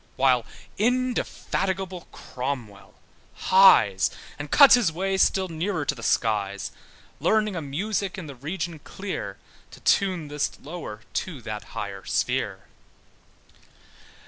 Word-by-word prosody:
While 130 -3 +3 0.3
indefatigable 195 -6 -1
Cromwell 125 -6 -6 0.4
hies, 185 - +6 0.3
And 145 0 -5
cuts 280 - +8
his 235 -9 +4
way 190 +4 -1
still 190 0 +3
nearer 165 -1 -2
to 140 - +1
the 120 - -11
skies, 105 -4 0 0.5
Learning 215 +6 +2
a 165 - -2
music 195 +7 -2
in 185 - -6
the 145 - -8
region 160 +5 -5
clear, 190 +6 -6 0.3
To - - -14
tune 185 -6 +2
this 150 0 -1
lower 145 -9 -7
to 165 -7 -3
that 105 -3 -5
higher 100 -2 -5
sphere. - - -1
160 Hz, 120 wpm, -25 LUFS, 125-190 Hz, 0.5 s, cuts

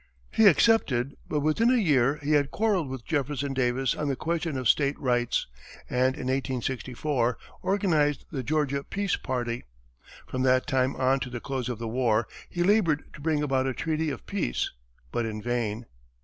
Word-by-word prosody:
He 220 - +5
accepted, 145 - +3
but 150 - 0
within 155 +11 +3
a 255 - +4
year 145 - +3
he 145 - -1
had 145 -2 +3
quarrelled 200 -8 0
with 130 -3 -6
Jefferson 140 -2 -1
Davis 130 0 +1
on 150 - -3
the 140 - 0
question 165 -1 -2
of 130 -2 -1
state 140 +2 +2
rights, 120 -2 +1 0.5
and 130 +1 +2
in - - -6
1864, 130 0 -1 0.2
organized 160 -8 +1
the 140 -5 -2
Georgia 140 0 0
Peace 200 +3 -1
party. 120 -2 -3 0.6
From 130 - -3
that 130 0 +3
time 130 0 +1
on 130 +1 +2
to 130 - -4
the 120 -1 -5
close 130 0 -3
of 120 - -3
the 115 +1 -5
war, 115 -2 +1 0.2
he 175 - -1
labored 175 -6 +2
to - - -11
bring 150 -1 +1
about 135 -2 +1
a 130 - -2
treaty 160 -1 -1
of 140 - -6
peace, - - -1 0.4
but 120 - 0
in 110 -1 -4
vain. 115 -1 -2
135 Hz, 175 wpm, -27 LUFS, 125-155 Hz, 0.6 s, He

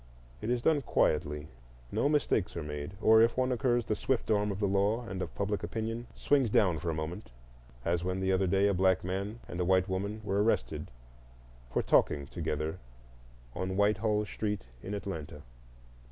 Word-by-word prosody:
It - - -3
is 120 -1 0
done 155 -3 +3
quietly; 75 - +1 0.4
no 140 - +1
mistakes 140 - +1
are 85 - -3
made, 75 +4 -5
or 110 0 +7
if 115 +2 +3
one 130 0 +2
occurs, 120 -1 +1
the 110 - 0
swift 120 +2 -1
arm 105 -1 +2
of 95 - -4
the 100 0 +1
law 100 +5 +1
and 95 -4 -5
of - - -5
public 100 -1 -1
opinion 115 +1 -4
swings 140 -5 +2
down 90 -6 +3
for 85 - -3
a - - 0
moment, 80 +6 -5 0.6
as 85 0 +1
when 95 +1 -1
the 95 0 +1
other 95 0 +2
day 100 +2 +3
a 100 - +2
black 95 0 +3
man 100 +5 -3
and 85 - -6
a - - +2
white 95 0 +3
woman 100 +3 -2
were 100 -1 +1
arrested 110 +2 0 0.8
for - - 0
talking 70 -1 +3
together 80 0 -3 0.7
on 95 0 -3
Whitehall 105 +1 +2
Street 105 - -3 0.2
in 100 - -4
Atlanta. 80 -7 -6
100 Hz, 180 wpm, -31 LUFS, 90-110 Hz, 0.8 s, or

